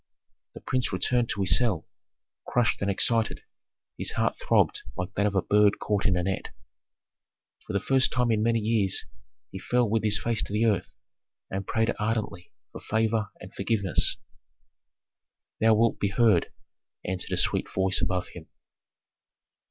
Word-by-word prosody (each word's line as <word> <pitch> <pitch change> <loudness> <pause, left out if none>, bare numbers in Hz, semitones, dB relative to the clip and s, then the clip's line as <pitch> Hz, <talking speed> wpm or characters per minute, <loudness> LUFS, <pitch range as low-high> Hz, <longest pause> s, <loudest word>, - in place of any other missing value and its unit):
The - - -10
prince 130 -1 -1
returned 115 +6 0
to 100 - -2
his 95 - +4
cell, 105 -10 0 0.6
crushed 120 -3 +1
and 100 - 0
excited; 115 +3 0 0.6
his - - -2
heart - - 0
throbbed - - +2 0.2
like 90 0 -4
that 100 +1 +1
of 100 - -3
a 95 - +2
bird 105 0 +3
caught 105 -1 -1
in 95 -3 +2
a 90 - 0
net. 95 +1 -2 1.2
For - - -5
the 100 - +1
first 135 +3 +2
time 125 -2 +1
in 110 -1 +1
many 115 +1 +2
years 105 -3 +1 0.5
he - - -7
fell 125 -1 +1
with 110 +1 0
his 105 -1 +3
face 115 -2 0
to - - -5
the 110 +2 +2
earth 100 -5 -1 0.5
and 95 0 -4
prayed 115 -1 0
ardently 105 -4 -3 0.2
for - - -10
favor 110 -1 0
and - - -12
forgiveness. 100 -8 +2 1.4
"Thou 110 0 +4
wilt 115 +1 +2
be 100 - 0
heard," 105 -4 +2 0.5
answered 95 0 -3
a - - 0
sweet - - +1
voice 95 0 +2
above 90 -2 -1
him. 80 -3 -12
105 Hz, 160 wpm, -26 LUFS, 95-115 Hz, 1.4 s, his